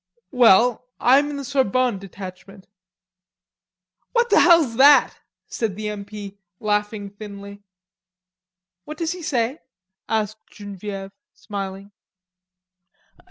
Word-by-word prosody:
"Well 245 0 +4
I'm 275 +4 +4
in 290 - -5
the 280 - -5
Sorbonne 255 -4 +1
Detachment." 195 0 -11 1.5
"What 475 0 +1
the - - +6
hell's 330 -10 +5
that?" 285 +2 +6 0.3
said 220 -5 -3
the 215 +1 -4
M. 205 -1 -6
P., 205 -1 -9 0.2
laughing 210 -1 -2
thinly. 200 -1 -10 1.2
"What 305 +7 -9
does 330 0 -2
he 360 -1 -6
say?" 255 -2 -1 0.5
asked 215 -1 -1
Genevieve, 200 -1 -8 0.2
smiling. 195 -1 -7
215 Hz, 105 wpm, -22 LUFS, 200-255 Hz, 1.5 s, the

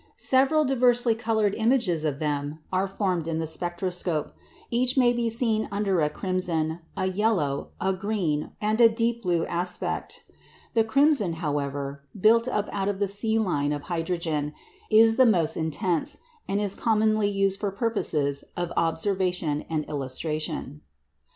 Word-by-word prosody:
Several 275 +4 +3
diversely 245 -3 +3
coloured 220 -2 0
images 225 - +1
of 145 -3 -1
them 145 0 -2 0.2
are 185 +1 +1
formed 185 -4 -1
in 165 -1 -1
the 160 - -1
spectroscope; 175 0 -2 0.4
each 250 +2 +1
may 245 -2 +5
be 240 -1 0
seen 225 -2 0
under 200 -3 0
a 150 - +2
crimson, 170 -2 -1 0.2
a 185 - 0
yellow, 185 -8 0
a 190 +1 +1
green, 185 -6 -2
and 215 +2 +1
a 230 - +8
deep 230 +1 -1
blue 175 -4 0
aspect. 180 +1 -2 0.5
The 225 - +4
crimson, 265 - +3
however 140 -3 -3 0.2
(built 230 +4 +4
up 210 -5 -1
out 195 0 -1
of 200 - -2
the 200 0 0
C 220 +3 0
line 145 -9 0
of 145 -1 -3
hydrogen), 165 -3 -2 0.3
is 225 +1 +6
the 260 -1 +6
most 165 -7 +2
intense, 160 +1 -1 0.3
and 200 - 0
is 205 -2 +1
commonly 215 -1 +2
used 195 -1 0
for 205 - -1
purposes 185 - -1
of 175 -1 -3
observation 170 -2 0
and 155 -2 -1
illustration. 150 +1 -4
190 Hz, 150 wpm, -26 LUFS, 160-220 Hz, 0.5 s, a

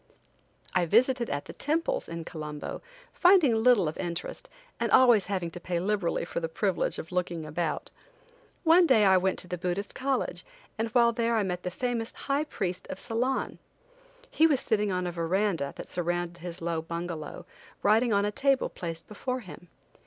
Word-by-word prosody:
I 180 -2 +2
visited 240 +5 +3
at 145 0 -3
the - - -9
temples 330 - -1
in 165 -1 -5
Colombo, 150 -3 -6 0.3
finding 355 -8 +5
little 225 -5 +4
of 155 - -4
interest, 170 -2 -5 0.3
and - - 0
always 240 -7 +6
having 185 -4 -2
to 175 - -8
pay 175 0 -2
liberally 190 -3 0
for - - -3
the 165 -1 -3
privilege 190 +2 0
of 160 - -7
looking 175 -3 -2
about. 155 +1 -3 0.7
One 340 +1 +6
day 220 -7 +5
I 190 -1 +6
went 185 +1 +1
to - - -3
the 180 -1 -4
Buddhist 180 +3 -2
college, 265 0 -2 0.3
and 225 0 -1
while 235 +1 +4
there 235 0 0
I 220 - +2
met 180 -2 -3
the 180 - -3
famous 235 +3 -2
high 285 +2 -1
priest 185 - -4
of 185 - -6
Ceylon. 250 +4 -2 0.7
He 320 - +5
was 285 -5 +2
sitting 210 -2 0
on 180 -1 -1
a 175 - -2
verandah, 170 -3 0
that - - -9
surrounded 175 0 -2
his 175 0 -7
low 165 -1 -1
bungalow, 170 -1 -6 0.4
writing 225 +3 +4
on 200 -1 +3
a 205 - 0
table 275 +4 +2
placed 165 -2 -6
before 255 +4 -4
him. 180 -3 -12
190 Hz, 180 wpm, -28 LUFS, 170-235 Hz, 0.7 s, always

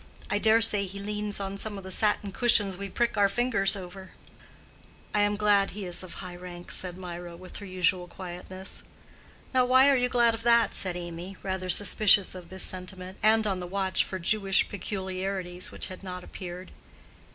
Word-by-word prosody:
I 205 - +1
dare 220 +1 +4
say 205 -3 +5
he 195 +1 -8
leans 210 +1 -3
on 195 0 -5
some 210 -1 -2
of 195 - -9
the 190 - -8
satin 205 0 +1
cushions 205 -3 +3
we 200 +2 -6
prick 235 +2 -1
our 200 -1 +4
fingers 205 -3 +1
over." 190 0 -10 1.0
"I 210 - +2
am 205 0 +2
glad 205 -1 +3
he 200 0 -7
is 175 -1 +4
of 185 -2 -7
high 180 -2 -8
rank," 175 -1 -9
said 180 -1 +2
Mirah, 175 -1 -8
with 185 +1 -10
her 200 - -9
usual 185 -1 0
quietness. 185 +1 -5 0.7
"Now, 255 -1 +4
why 260 +2 +5
are - - +4
you 250 -1 +1
glad 235 -2 +3
of 225 - -5
that?" 235 0 +3
said 180 -2 -1
Amy, 175 +2 -8
rather 190 -1 -3
suspicious 200 +1 +5
of 180 -2 -10
this 190 0 -4
sentiment, 185 0 -5
and 220 +1 +4
on 195 -3 -1
the 180 - -6
watch 190 0 +1
for 190 - -6
Jewish 195 +2 +2
peculiarities 190 -2 -4
which - - -5
had 185 - -9
not 180 -1 -7
appeared. 180 0 -9
195 Hz, 190 wpm, -27 LUFS, 185-210 Hz, 1.0 s, say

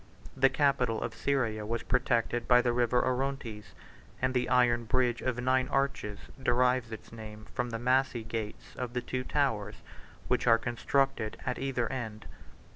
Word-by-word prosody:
The 135 0 +5
capital 135 -5 +2
of 115 - -3
Syria 120 -6 0
was 115 +2 -2
protected 120 -1 +1
by 125 -1 +6
the 120 - +2
River 125 0 +2
Orontes; 125 -8 -3 0.4
and 130 0 0
the 125 -1 0
iron 120 -2 +3
bridge, 120 0 +1
891 - - 0
of 125 0 -3
nine 130 0 +3
arches, 135 -7 -1 0.2
derives 125 -1 +2
its 110 - -9
name 110 -1 -9
from 125 0 -1
the 115 - -3
massy 125 0 +1
gates 110 -2 -6
of 125 -2 -4
the 125 - -1
two 130 +1 -3
towers 115 -9 0 0.5
which - - +1
are 115 -1 +7
constructed 120 0 0
at 125 -2 -2
either 130 -3 -1
end. 110 -5 -5
125 Hz, 165 wpm, -30 LUFS, 115-130 Hz, 0.5 s, are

